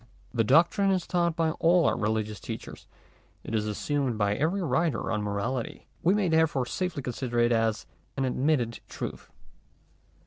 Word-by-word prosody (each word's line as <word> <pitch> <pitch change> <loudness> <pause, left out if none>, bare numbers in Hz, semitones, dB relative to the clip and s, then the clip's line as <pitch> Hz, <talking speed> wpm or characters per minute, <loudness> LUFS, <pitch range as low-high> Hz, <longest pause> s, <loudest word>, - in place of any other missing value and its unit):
The 115 -3 +2
doctrine 170 - +4
is 185 -3 +1
taught 170 -2 +1
by 165 -1 +1
all 170 0 +4
our - - +3
religious 110 -2 -1
teachers; - - -8 0.6
it - - -7
is 110 -1 0
assumed 130 +3 -1
by 105 -1 +2
every 165 - 0
writer 160 -5 0
on 105 -2 0
morality: 105 +5 -3 0.2
we 185 +4 +3
may 205 -3 +1
therefore 160 -5 +2
safely 175 0 -3
consider 125 -1 -3
it 120 0 +4
as 115 -1 +1 0.3
an 135 - +1
admitted 130 -2 0
truth. - - -6
130 Hz, 160 wpm, -28 LUFS, 115-165 Hz, 0.6 s, doctrine